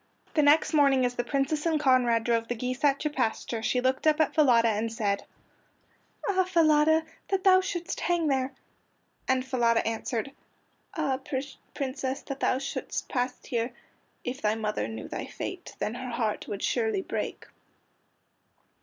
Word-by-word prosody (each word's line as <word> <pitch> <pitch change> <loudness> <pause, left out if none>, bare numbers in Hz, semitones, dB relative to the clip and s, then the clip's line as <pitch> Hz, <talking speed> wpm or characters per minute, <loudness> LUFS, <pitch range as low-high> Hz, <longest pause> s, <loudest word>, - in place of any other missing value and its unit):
The 305 - +3
next 300 +2 +4
morning 275 -4 +4
as 245 - 0
the 245 - -2
Princess 280 +4 0
and 320 -2 +2
Conrad 250 -5 +3
drove 230 -1 +1
the 240 - -2
geese 250 +3 -4
out 280 -1 +4
to 300 - 0
pasture 230 -3 -1
she 250 +3 +1
looked 260 +4 +1
up 305 0 +4
at 315 - +2
Falada 240 -7 +5
and 220 +1 -1
said: 210 -3 -1 1.0
"Ah, 375 -2 +3
Falada, 315 -3 +4 0.2
that 390 -1 0
thou 370 -1 +6
shouldst 350 -3 -4
hang 345 -2 +1
there!" 265 -2 +1 0.8
And 260 0 +1
Falada 235 -3 +2
answered: 225 +2 -2 0.6
"Ah, 280 -5 0 0.6
Princess, 265 -1 -3
that 275 -1 -6
thou - - +2
shouldst 275 - -4
pass 250 -1 -2
here! 240 -1 -2 0.5
If 260 +2 -4
thy 210 0 +2
mother 210 - -2
knew 110 0 -6
thy - - -5
fate, - - -7
Then 215 - -2
her 255 +1 -6
heart 225 -3 -2
would 200 - -5
surely 440 -4 0
break!" - - -4
260 Hz, 160 wpm, -28 LUFS, 235-305 Hz, 1.0 s, thou